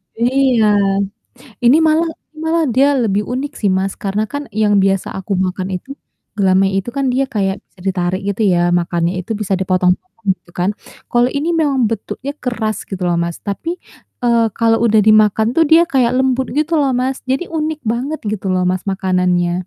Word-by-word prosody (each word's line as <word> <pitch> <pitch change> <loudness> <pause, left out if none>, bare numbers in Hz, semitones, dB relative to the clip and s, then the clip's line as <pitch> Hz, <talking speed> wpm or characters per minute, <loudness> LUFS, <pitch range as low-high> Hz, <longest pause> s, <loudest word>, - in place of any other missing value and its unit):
iya. 245 -2 +2 0.9
Ini 250 +6 +6
malah 320 +1 +3 0.3
malah 320 +1 +1
dia 275 +4 +3
lebih 210 -5 0
unik 270 +4 -3
sih, 200 -3 +1
Mas, 190 +1 -1
karena 200 +1 -1
kan 285 0 -5
yang 210 -2 +3
biasa 195 -1 +1
aku 195 +1 -4
makan 185 0 -2
itu, 275 +10 -7 0.4
gelamai 195 0 +3
itu 235 +6 -5
kan 275 -2 0
dia 265 +2 +1
kayak 200 -6 -1
bisa 185 - -23
ditarik 185 0 -1
gitu 200 +2 -2
ya, 175 -1 +2
makannya 175 +1 0
itu 225 - -3
bisa 200 -3 -1
dipotong-potong 185 - -1
gitu - - -23
kan. 180 +3 0 0.4
Kalau 240 0 +3
ini 295 +4 -1
memang 270 -8 +1
bentuknya 235 +5 -4
keras 225 -4 -3
gitu 190 -2 -6
loh, 175 -1 +1
Mas, 170 0 -3
tapi, 205 - -3 0.5
eee, 235 -1 +3
kalau 225 -1 +2
udah 220 -1 +4
dimakan 215 +1 +4
tuh 325 - +5
dia 320 +3 +6
kayak 255 -3 +2
lembut 260 0 +1
gitu 310 +2 +1
loh, 275 -3 +2
Mas. 260 +2 -1
Jadi 270 +7 -2
unik 310 -1 -2
banget 250 +7 -2
gitu 205 -2 -4
loh, 185 0 +1
Mas, 185 +1 -1
makanannya. 180 -2 0
220 Hz, 175 wpm, -17 LUFS, 190-265 Hz, 0.9 s, Ini